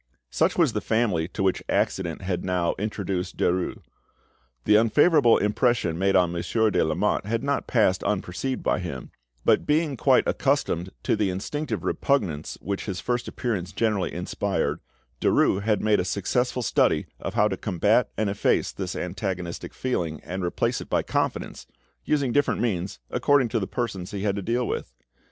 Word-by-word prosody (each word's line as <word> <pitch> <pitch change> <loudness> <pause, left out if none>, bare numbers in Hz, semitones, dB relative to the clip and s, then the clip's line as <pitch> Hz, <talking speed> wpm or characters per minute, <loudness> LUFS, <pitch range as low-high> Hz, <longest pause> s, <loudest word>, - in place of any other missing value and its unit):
Such - - +1
was - - +3
the - - -1
family 105 -8 +1
to 95 - -4
which 95 -1 +1
accident 85 -1 -1
had 90 -1 -2
now 90 -2 0
introduced 100 -3 -3
Derues. 90 0 0 0.8
The 105 - +5
unfavourable 120 +4 +5
impression 105 -5 +1
made 95 0 +2
on 90 -2 +4
Monsieur 110 +6 +1
de - - +2
Lamotte 80 +5 0
had 115 +2 -1
not 140 0 -1
passed 105 -6 +2
unperceived 105 +6 -2
by - - +1
him; 85 -8 -6 0.3
but, - - +3
being 150 -1 +2
quite - - +3
accustomed 85 +3 0
to - - +2
the 105 -2 +1
instinctive 145 +12 -3
repugnance 95 - -1
which 100 +1 -3
his 95 -3 -4
first 120 -1 -2
appearance 105 -8 -3
generally 105 -5 0
inspired, - - -2 0.4
Derues 95 - +3
had 105 0 +1
made 105 -1 +3
a - - +1
successful 125 +7 -1
study - - +2
of - - -5
how 105 - +4
to 95 - -2
combat 105 +5 +2
and 110 - +1
efface 100 +1 +1
this - - -5
antagonistic 90 -1 -4
feeling, 85 -11 -2
and 90 +3 -5
replace 85 - 0
it - - -9
by - - +1
confidence, - - -2 0.4
using 140 -4 +1
different 145 +3 +2
means 95 -6 -1
according 140 -4 +3
to 115 - 0
the 95 - -3
persons 100 -7 -3
he 100 -2 -5
had 100 -2 +1
to 100 - -3
deal 120 +5 0
with. - - -4
100 Hz, 170 wpm, -25 LUFS, 90-120 Hz, 0.8 s, The